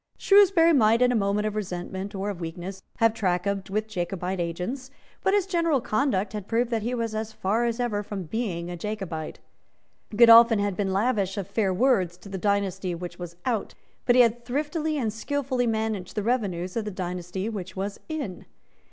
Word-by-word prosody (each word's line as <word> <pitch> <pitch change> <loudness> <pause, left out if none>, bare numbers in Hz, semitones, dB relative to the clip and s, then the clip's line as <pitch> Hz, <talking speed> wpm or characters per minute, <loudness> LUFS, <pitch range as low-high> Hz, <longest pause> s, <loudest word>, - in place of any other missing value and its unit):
Shrewsbury 385 -5 +5
might, 230 -3 +4
in 250 - +4
a - - +1
moment 205 0 +1
of 215 -1 -2
resentment 190 0 -4
or 195 +2 -2
of 180 -3 -8
weakness, 175 +3 -6 0.2
have 225 -1 +4
trafficked 195 -1 -1
with 215 +2 -1
Jacobite 185 -1 -3
agents; 180 +11 -3 0.3
but 385 - +2
his 405 -3 +2
general 335 -6 +1
conduct 215 -4 0
had 210 -2 -5
proved 235 +1 0
that 225 -1 0
he 240 +4 -2
was 230 -2 -2
as 220 0 -3
far 220 +3 0
as 235 0 -1
ever 230 -4 0
from 200 -2 -5
being 180 -2 -3
a - - -4
Jacobite. 175 -5 -5 0.8
Godolphin 230 0 +8
had 200 -1 0
been 195 0 -1
lavish 200 -1 0
of 195 -2 -3
fair 200 -1 0
words 185 -5 +2
to 200 - -13
the 190 -1 -5
dynasty 195 -3 0
which 175 +1 -7
was 175 -1 -7
out; 230 -5 -1 0.3
but 245 - +5
he 250 - +8
had 235 +1 0
thriftily 300 +5 -2
and 225 -6 -1
skilfully 260 +1 -1
managed 220 -4 -2
the 210 - -1
revenues 195 -7 -1
of 225 -2 -1
the - - -2
dynasty 180 0 -4
which 195 -5 -5
was 200 +1 -4
in. 280 - -5
210 Hz, 190 wpm, -26 LUFS, 190-240 Hz, 0.8 s, Godolphin